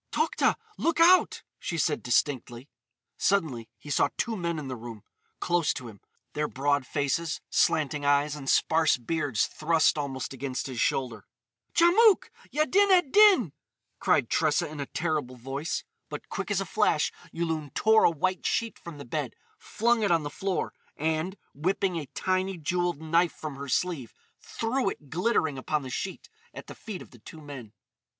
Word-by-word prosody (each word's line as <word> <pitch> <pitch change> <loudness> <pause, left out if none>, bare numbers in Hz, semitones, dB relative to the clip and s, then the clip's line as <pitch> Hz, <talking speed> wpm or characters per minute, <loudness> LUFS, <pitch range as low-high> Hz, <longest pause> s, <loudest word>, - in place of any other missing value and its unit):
"Tokhta! 315 +1 +2 0.2
Look 335 0 +1
out!" 360 +2 +5 0.2
she 165 - -4
said 155 -1 +1
distinctly. 125 0 0 0.5
Suddenly 145 - 0
he 145 - -9
saw - - +3
two 230 -2 -1
men 170 -4 -2
in 150 -3 -5
the 130 - -4
room, 115 -3 -9 0.4
close 175 -3 +1
to 125 -3 -6
him—their 115 +7 -7
broad 140 0 0
faces, 145 +3 -1
slanting 150 -1 +1
eyes, 145 +1 +2
and 135 -3 -5
sparse 160 -3 +3
beards 135 -2 0
thrust 155 -1 +2
almost 135 -2 -4
against 130 -1 -4
his 130 -4 -3
shoulder. 120 -5 -1 0.5
"Djamouk! 385 +5 +5 0.2
Yaddin 375 +7 +3
ed 355 -8 +4
Din!" 400 - +6 0.5
cried - - +2
Tressa - - +1
in 150 0 -9
a 140 - -3
terrible 155 -6 -2
voice. 135 +6 -4 0.3
But - - -8
quick - - -4
as - - +1
a - - -3
flash - - +1 0.2
Yulun 160 -4 -3
tore 220 0 +4
a - - +7
white 185 +4 -1
sheet 230 -2 -1
from 170 -3 -9
the 140 - -9
bed, 120 - -3 0.2
flung 235 +1 +1
it 205 - +2
on 165 -2 +3
the 145 - -5
floor, 190 +4 -2 0.2
and, 160 +5 -1 0.2
whipping 180 +4 0
a 150 -4 -5
tiny, 185 +5 -1
jewelled 175 0 -1
knife 165 +2 +2
from 155 -3 -7
her 140 0 -7
sleeve, 145 -6 -1 0.2
threw 235 0 -1
it 145 -7 -10
glittering 160 - +1
upon 150 +2 -1
the 130 - -7
sheet 190 +7 -5 0.3
at - - -8
the - - -9
feet 210 -5 -8
of - - -19
the 120 - -16
two 160 +8 -12
men. 140 -8 -9
155 Hz, 170 wpm, -27 LUFS, 140-185 Hz, 0.5 s, a